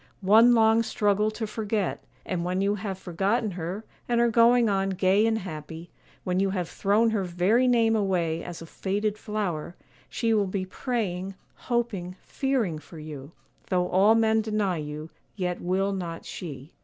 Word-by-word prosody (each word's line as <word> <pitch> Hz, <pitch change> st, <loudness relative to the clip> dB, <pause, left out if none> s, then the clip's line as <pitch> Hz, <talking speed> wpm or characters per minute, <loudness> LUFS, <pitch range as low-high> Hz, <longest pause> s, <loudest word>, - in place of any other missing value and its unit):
one 225 Hz, +5 st, +7 dB
long 225 Hz, 0 st, +5 dB
struggle 210 Hz, -1 st, +1 dB
to 220 Hz, +1 st, -4 dB
forget; 215 Hz, -2 st, -2 dB, 0.2 s
and 180 Hz, -2 st, -2 dB
when 180 Hz, +1 st, -1 dB
you 200 Hz, +1 st, +2 dB
have 195 Hz, -2 st, -4 dB
forgotten 195 Hz, +5 st, -1 dB
her, 180 Hz, +4 st, -5 dB, 0.2 s
and 240 Hz, -1 st, +2 dB
are 235 Hz, 0 st, +3 dB
going 235 Hz, +1 st, +5 dB
on 195 Hz, -1 st, +1 dB
gay 195 Hz, +3 st, +3 dB
and 225 Hz, 0 st, +1 dB
happy, 160 Hz, -2 st, -8 dB, 0.3 s
when 180 Hz, 0 st, 0 dB
you 195 Hz, 0 st, +2 dB
have 185 Hz, -3 st, -2 dB
thrown 210 Hz, +6 st, +2 dB
her 210 Hz, -3 st, 0 dB
very 185 Hz, +8 st, +2 dB
name 230 Hz, -2 st, +3 dB
away 175 Hz, -6 st, 0 dB
as 170 Hz, -1 st, -7 dB
a -, -, -9 dB
faded 205 Hz, +5 st, -2 dB
flower, 200 Hz, -7 st, -3 dB, 0.3 s
she 230 Hz, -2 st, 0 dB
will 205 Hz, -2 st, +2 dB
be 185 Hz, 0 st, -2 dB
praying, 195 Hz, -3 st, -3 dB, 0.2 s
hoping, 225 Hz, -7 st, -2 dB
fearing 245 Hz, -, -1 dB
for 155 Hz, +2 st, -13 dB
you; 150 Hz, -2 st, -8 dB, 0.4 s
though 180 Hz, -1 st, +1 dB
all 200 Hz, +4 st, +5 dB
men 220 Hz, -1 st, +3 dB
deny 210 Hz, -4 st, -1 dB
you, 150 Hz, +1 st, -6 dB, 0.2 s
yet 180 Hz, -3 st, -2 dB
will 190 Hz, +3 st, 0 dB
not 170 Hz, -3 st, -5 dB
she. 145 Hz, -3 st, -8 dB
195 Hz, 165 wpm, -26 LUFS, 180-220 Hz, 0.4 s, one